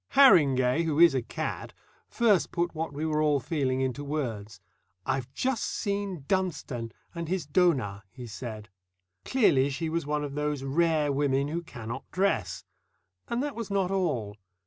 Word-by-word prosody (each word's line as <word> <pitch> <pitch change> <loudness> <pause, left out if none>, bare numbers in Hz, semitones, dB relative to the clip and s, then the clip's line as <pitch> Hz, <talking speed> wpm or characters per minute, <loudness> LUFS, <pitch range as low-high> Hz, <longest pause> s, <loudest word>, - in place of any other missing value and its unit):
Harringay, 145 - +6
who 160 -2 0
is 170 -3 +8
a 130 - +1
cad, - - -5 0.3
first 215 -6 +2
put 175 0 -1
what 160 -1 -3
we 145 +2 -3
were 155 -1 +1
all 150 -2 +3
feeling 130 -1 -1
into 130 +1 -2
words. 115 -8 -4 0.5
"I've 130 -1 -2
just 255 - -1
seen 200 -7 -3
Dunstone 150 - -2 0.2
and 170 -2 -4
his 180 -2 -1
donah," 140 - +2
he 125 -1 -9
said. 110 -1 -7 0.6
Clearly 145 - +3
she 160 +4 -3
was 165 -2 -2
one 150 0 0
of 145 -1 -5
those 150 -1 -2
rare 155 +1 +2
women 140 0 +1
who 170 +3 -2
cannot 120 -5 -8
dress. 185 - 0 0.6
And 240 +3 -1
that 290 -1 -3
was 230 -3 -5
not 195 -2 0
all. 120 - -1
150 Hz, 160 wpm, -28 LUFS, 130-175 Hz, 0.6 s, is